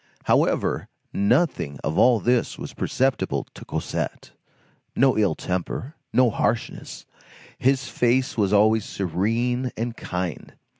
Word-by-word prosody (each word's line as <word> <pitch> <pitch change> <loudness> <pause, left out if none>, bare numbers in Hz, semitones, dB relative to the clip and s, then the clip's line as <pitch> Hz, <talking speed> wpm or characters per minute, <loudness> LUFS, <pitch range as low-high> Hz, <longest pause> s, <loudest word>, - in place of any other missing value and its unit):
However, - - +1 0.3
nothing 100 - +1
of 80 - -1
all 120 -2 +5
this 120 +2 +1
was - - -7
perceptible 130 0 0
to - - -11
Cosette. - - -4 0.6
No 135 +1 +4
ill 105 -2 +2
temper, 95 - -3 0.2
no 125 -2 +4
harshness. 115 +3 -2 0.5
His 130 0 +2
face 130 +4 +1
was 100 -4 +1
always 110 +1 +4
serene 115 +8 -1
and 115 +1 -3
kind. 90 -5 -5
115 Hz, 115 wpm, -24 LUFS, 100-125 Hz, 0.6 s, all